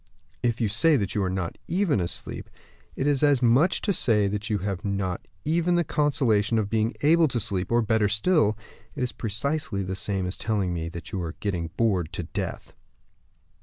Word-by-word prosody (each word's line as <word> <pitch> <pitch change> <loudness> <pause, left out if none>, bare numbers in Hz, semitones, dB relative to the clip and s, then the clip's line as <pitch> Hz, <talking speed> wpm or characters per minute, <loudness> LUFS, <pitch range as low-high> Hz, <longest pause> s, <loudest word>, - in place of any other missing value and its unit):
"If 120 -1 0
you 115 - +1
say 150 +10 +4
that 100 -7 -1
you 105 - 0
are 95 - 0
not 95 -2 -3
even 175 - +1
asleep, 85 -1 -3 0.5
it 135 - -2
is 145 -2 +3
as 145 -4 +3
much 125 +9 +4
as - - -3
to 200 - +1
say 105 - +3
that 105 +3 -3
you 105 - +1
have 100 -1 -4
not 95 -3 -2 0.2
even 170 +3 +2
the 175 - +3
consolation 125 -8 +1
of 105 -2 -1
being 110 +1 +1
able 160 +2 +5
to 125 -3 -1
sleep; 95 -2 -2
or, 120 0 +3
better 110 -1 +2
still, 110 - +2 0.4
it - - -2
is 125 - -1
precisely 115 0 -2
the 95 0 -4
same 95 -1 -1
as 90 - -4
telling 100 -5 -1
me 85 -1 -3
that 85 0 -8
you 95 - -2
are 80 -2 -5
getting 90 -5 -2
bored 95 -8 +1
to - - -3
death." - - -5
110 Hz, 205 wpm, -26 LUFS, 95-140 Hz, 0.5 s, able